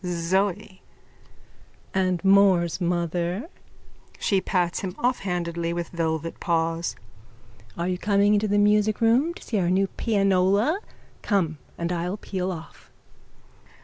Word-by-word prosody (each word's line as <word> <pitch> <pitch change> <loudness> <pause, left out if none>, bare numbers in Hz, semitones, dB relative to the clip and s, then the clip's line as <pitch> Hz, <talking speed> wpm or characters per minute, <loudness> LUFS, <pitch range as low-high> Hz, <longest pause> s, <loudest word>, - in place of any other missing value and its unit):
ZOE: 185 +3 -1 1.1
And 185 -1 0
more's 190 -3 +4
mother? 175 - -1 0.7
(She 195 -2 +1
pats 180 -3 0
him 185 -1 -5
offhandedly 175 -8 -1
with 170 -1 -4
velvet 165 -1 -3
paws.) 165 0 -1 0.8
Are 170 +1 -1
you 180 -1 -2
coming 205 0 +3
into 210 +1 +2
the 205 0 +1
musicroom 215 +8 +3
to - - -11
see 215 - -1
our 175 -2 +1
new 190 +2 +3
pianola? 200 - +1 0.4
Come 170 -7 0 0.2
and 170 +1 -2
I'll 180 +3 -2
peel 190 -2 -3
off. 165 -2 -10
185 Hz, 115 wpm, -25 LUFS, 170-205 Hz, 1.1 s, more's